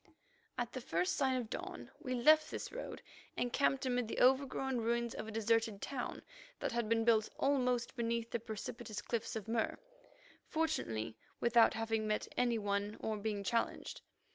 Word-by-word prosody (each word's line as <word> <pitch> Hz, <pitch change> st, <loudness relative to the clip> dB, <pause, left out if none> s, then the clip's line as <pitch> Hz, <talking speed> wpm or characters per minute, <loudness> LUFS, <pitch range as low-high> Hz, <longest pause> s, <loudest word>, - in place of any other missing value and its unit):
At 245 Hz, -1 st, -1 dB
the 255 Hz, -, -5 dB
first 175 Hz, -4 st, 0 dB
sign 265 Hz, -1 st, +2 dB
of 240 Hz, -, -4 dB
dawn -, -, -6 dB
we 255 Hz, -2 st, -2 dB
left 305 Hz, +5 st, +6 dB
this -, -, -5 dB
road -, -, -6 dB, 0.3 s
and 245 Hz, -1 st, -1 dB
camped 275 Hz, -1 st, +2 dB
amid 245 Hz, -2 st, +1 dB
the -, -, -3 dB
overgrown 265 Hz, 0 st, +3 dB
ruins 235 Hz, +1 st, 0 dB
of -, -, -5 dB
a -, -, -5 dB
deserted 225 Hz, -1 st, +1 dB
town 255 Hz, +1 st, -4 dB, 0.4 s
that -, -, -1 dB
had 235 Hz, -2 st, -1 dB
been 225 Hz, 0 st, +3 dB
built 220 Hz, -2 st, +4 dB
almost 250 Hz, -3 st, +1 dB
beneath 235 Hz, -1 st, -1 dB
the 235 Hz, -, 0 dB
precipitous 220 Hz, 0 st, -5 dB
cliffs 230 Hz, -2 st, -2 dB
of 220 Hz, -2 st, -4 dB
Mur, 225 Hz, 0 st, 0 dB, 0.7 s
fortunately 115 Hz, -, -1 dB, 0.2 s
without 235 Hz, -1 st, +5 dB
having 225 Hz, -1 st, 0 dB
met 215 Hz, 0 st, 0 dB
any 240 Hz, -2 st, +2 dB
one 205 Hz, 0 st, -1 dB
or 220 Hz, -, -1 dB
being 205 Hz, -1 st, -2 dB
challenged. 230 Hz, +4 st, -1 dB
230 Hz, 165 wpm, -36 LUFS, 220-250 Hz, 0.7 s, left